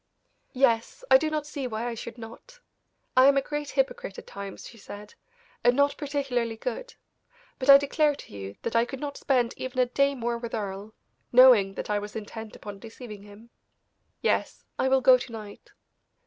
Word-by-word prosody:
"Yes; 235 -3 +1
I 265 - +9
do 315 - -1
not 305 -1 -2
see 285 -3 -5
why 225 0 -4
I 240 - -3
should 235 +1 -8
not. 235 - -12 0.6
I 255 +1 +7
am 280 0 +5
a - - +4
great 295 -1 -4
hypocrite 265 -7 -2
at - - -9
times," 200 -1 -8
she 230 - -14
said, 205 +1 -10 0.5
"and 245 +1 +4
not 285 +1 +3
particularly 270 -6 -2
good; - - -5 0.6
but 265 +1 -2
I 275 - +12
declare 290 +1 +1
to - - -13
you 100 0 -7
that 230 - -3
I 230 - +5
could 260 +2 -6
not 285 0 -5
spend 245 -4 +1
even 255 0 -6
a 255 - +4
day 275 +3 +1
more 235 -1 -2
with 235 -1 -5
Earle, 205 0 -5 0.4
knowing 240 -6 +7
that - - -4
I 205 - +1
was 205 +1 -8
intent 220 0 -7
upon 205 -1 -9
deceiving 220 -1 -10
him. 205 +3 -15 0.7
Yes, - - -1
I - - +2
will 265 0 +3
go 255 0 +7
to 245 - -8
night." 215 -3 -10
240 Hz, 190 wpm, -27 LUFS, 220-275 Hz, 0.7 s, I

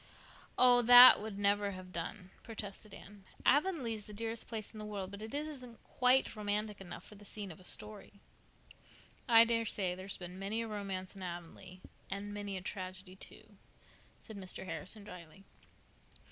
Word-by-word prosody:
"Oh, 245 -1 +8
that 245 0 +10
would 210 -2 -6
never 200 0 +1
have 185 0 -10
done," 180 +3 -6
protested 215 -2 -8
Anne. 200 0 -13 0.2
"Avonlea 290 -4 +2
is 210 -2 -7
the 210 - -10
dearest 225 +1 -4
place 220 -2 -6
in 215 - -9
the 215 - -6
world, 200 -3 -5
but 200 +1 -9
it 220 0 -7
isn't 280 -6 -5
quite 250 0 +2
romantic 210 0 -3
enough 175 -2 -9
for - - -13
the 205 0 -15
scene 205 -1 -7
of 160 - -12
a - - -16
story." 210 +3 -5 1.2
"I 230 -1 +8
daresay 225 -5 0
there's 185 +2 -7
been 180 +1 -9
many 210 +4 -2
a - - -6
romance 195 -3 -5
in 195 - -11
Avonlea—and 185 +3 -8
many 205 -2 -5
a - - -6
tragedy, 185 -1 -7
too," 215 +1 -13 0.6
said 220 - -8
Mr. 190 0 -6
Harrison 185 +5 -6
drily. 180 -1 -12
205 Hz, 165 wpm, -34 LUFS, 185-225 Hz, 1.2 s, that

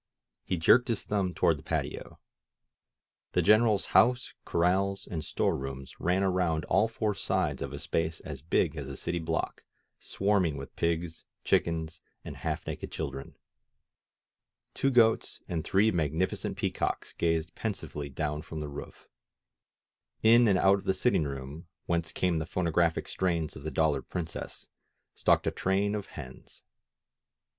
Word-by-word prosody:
He 90 - -1
jerked 115 +9 +5
his 115 -4 -1
thumb 95 -4 -1
toward 85 -4 +3
the - - -14
patio. - - -3 1.2
The - - +3
Greneral's 110 -1 +4
house, 125 +1 +4
corrals 95 +3 +1
and 80 -3 -4
store - - 0
rooms 70 0 -7
ran 90 +2 +1
around 90 -5 +1
all 110 - +3
four 110 -2 -1
sides - - -1
of 70 - -3
a 70 - -5
space 80 +2 -1
as 70 -4 -7
big 80 0 +1
as 70 -4 -5
a 70 -1 -6
city 85 - -2
block, 80 - -2 0.4
swarming 95 -7 +1
with 70 - -9
pigs, 85 0 -1 0.2
chickens 80 0 0 0.2
and - - -7
half - - -3
naked - - -5
children. 70 0 -5 1.4
Two 135 - +1
goats 115 -4 +3
and 80 -3 -2
three 105 +3 +3
magnificent 80 +1 -1
pea - - 0
cocks - - -2
gazed 80 -1 0
pensively 75 -9 -4
down 75 +2 -2
from 80 -1 -7
the 75 -1 -4
roof. 70 - -9 1.2
In 115 +2 +7
and 100 -3 +4
out 95 +1 +4
of - - -13
the 95 - +2
sitting 95 -5 +2
room, 70 +4 -6 0.2
whence 85 -1 -1
came 90 -3 0
the 80 - -4
phonographic 85 -2 +1
strains 85 -5 -1
of - - -9
the 75 - -4
^^Dollar 75 -4 +2
Princess," 85 -2 -5 0.5
stalked - - +2
a - - +1
train 100 +2 0
of 105 -2 -3
hens. 65 -4 -11
85 Hz, 150 wpm, -29 LUFS, 75-95 Hz, 1.4 s, In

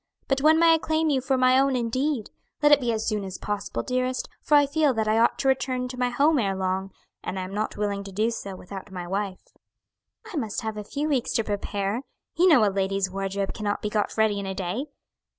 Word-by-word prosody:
But 270 0 +1
when 310 +2 +6
may 330 0 +6
I - - +5
claim 315 0 +1
you 265 -2 +1
for 265 +1 +1
my 255 0 +5
own 275 -1 +2
indeed? 250 +1 -1 0.3
Let 295 - +6
it 290 - +8
be 240 -2 0
as 220 -1 -2
soon 210 -2 0
as 190 -1 -6
possible, 200 - -3
dearest, 255 0 -1
for 300 - +3
I 290 - +5
feel 290 -2 +2
that 220 -1 0
I 215 +1 +3
ought 235 - +3
to 270 - -1
return 260 -1 +1
to 250 0 -7
my 250 0 +2
home 285 +5 +3
ere 195 -4 0
long, 190 0 -2 0.3
and 190 - -4
I 185 - -2
am 185 +1 -7
not 215 +1 -2
willing 205 -1 -1
to 195 - -8
do 215 +4 +1
so 200 -4 -6
without 190 +2 -9
my 180 -2 -6
wife." 195 0 -4 0.8
"I - - -3
must 225 -4 -2
have 220 -2 -4
a 210 - -5
few 290 +8 -3
weeks 275 -6 0
to 225 - +1
prepare; 205 +1 -2 0.3
you 355 +2 +4
know 260 -11 +6
a 200 - -1
lady's 195 -1 0
wardrobe 195 0 -2
cannot 205 -2 -3
be 210 - -2
got 210 0 -1
ready 215 -2 +2
in 200 - -4
a 190 - -4
day. 195 +10 -3
220 Hz, 240 wpm, -25 LUFS, 200-265 Hz, 0.8 s, it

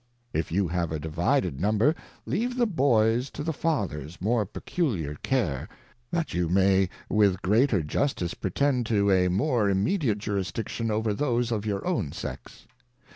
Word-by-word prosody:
If 80 +1 -1
you 95 +2 +1
have 85 -1 -1
a 80 - -1
divided 75 -2 0
Number, 110 - +3 0.3
leave 245 +5 -1
the 240 - +3
Boys 125 - +2
to - - -6
the 160 +1 -1
Father's 95 - -2
more 110 +1 +1
peculiar 100 - -2
Cai"e, 95 - 0 0.4
that 170 -2 -2
you 90 -2 0
may 95 0 +3 0.2
with 105 -1 +4
the 90 - -8
greater 105 - +3
Justice 90 - -1
pretend 125 +5 0
to 100 -3 +2
a 90 -1 +4
more 105 +3 +1
immediate 110 - +1
Jurisdiction 105 +3 -3
over 110 0 0
those 120 -1 0
of 110 -1 -2
your 100 -2 -2
own 170 - -1
Sex. - - -8
105 Hz, 155 wpm, -27 LUFS, 90-130 Hz, 0.4 s, with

